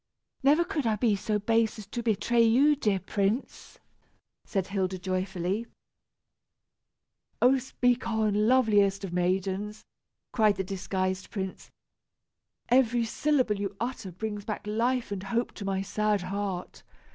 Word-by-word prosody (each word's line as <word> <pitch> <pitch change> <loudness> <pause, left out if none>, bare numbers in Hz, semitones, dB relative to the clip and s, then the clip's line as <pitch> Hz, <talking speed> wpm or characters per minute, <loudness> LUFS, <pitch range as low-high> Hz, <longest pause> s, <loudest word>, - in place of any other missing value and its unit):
"Never 290 +5 +4
could 320 -8 -2
I 220 - +2
be 215 -1 +2
so 210 +2 -1
base 225 +2 +1
as 215 - -8
to 235 +4 -5
betray 235 +1 +2
you, 260 +7 +5
dear 210 -8 +1
prince," 200 +5 -2 0.7
said 195 -3 -1
Hilda 190 -1 -2
joyfully. 185 +3 -2 1.7
"Oh! 260 +2 +5
speak 245 -1 0
on, 215 -1 +1
loveliest 205 -6 +3
of 185 -3 -5
maidens," 190 +4 -1 0.5
cried 215 -3 +3
the 190 - -2
disguised 185 0 -3
prince. 190 -3 -5 1.0
"Every 240 -2 +3
syllable 255 -4 +1
you 200 0 -3
utter 230 -4 -4
brings 210 +3 -5
back 210 0 -5
life 230 +3 0
and 200 -2 -3
hope 235 +5 -1
to 205 - -8
my 195 0 -1
sad 210 0 0
heart. 190 -1 -4
210 Hz, 135 wpm, -28 LUFS, 195-235 Hz, 1.7 s, you